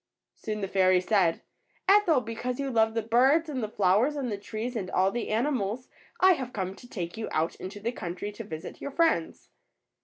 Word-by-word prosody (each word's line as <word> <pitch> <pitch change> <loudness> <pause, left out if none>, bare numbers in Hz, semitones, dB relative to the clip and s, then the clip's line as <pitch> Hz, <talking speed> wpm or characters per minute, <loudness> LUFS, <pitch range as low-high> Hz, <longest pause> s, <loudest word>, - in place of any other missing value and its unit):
Soon 215 -1 -5
the 195 - -1
fairy 185 -1 +4
said: 185 -3 +1 0.4
^^Ethel, 380 -8 +5
because 240 +3 -4
you 275 -1 -2
love 225 -1 +2
the 225 - 0
birds 265 +9 +4
and 265 -4 -3
the 215 - -3
flowers 210 +8 +2
and 265 -5 -2
the 205 - -2
trees 225 +4 -5
and 190 -5 -3
all 190 +1 +2
the 240 +1 -3
animals, 235 0 -1 0.3
I 375 0 +7
have 260 -8 -1
come 190 -2 -3
to 245 - -13
take 175 -3 -5
you 225 - -4
out 160 +2 0
into 195 +2 -7
the 225 +3 -2
country 185 -2 -5
to 220 +2 -8
visit 160 -6 -8
your - - -4
friends." 300 - 0
225 Hz, 205 wpm, -28 LUFS, 195-255 Hz, 0.4 s, I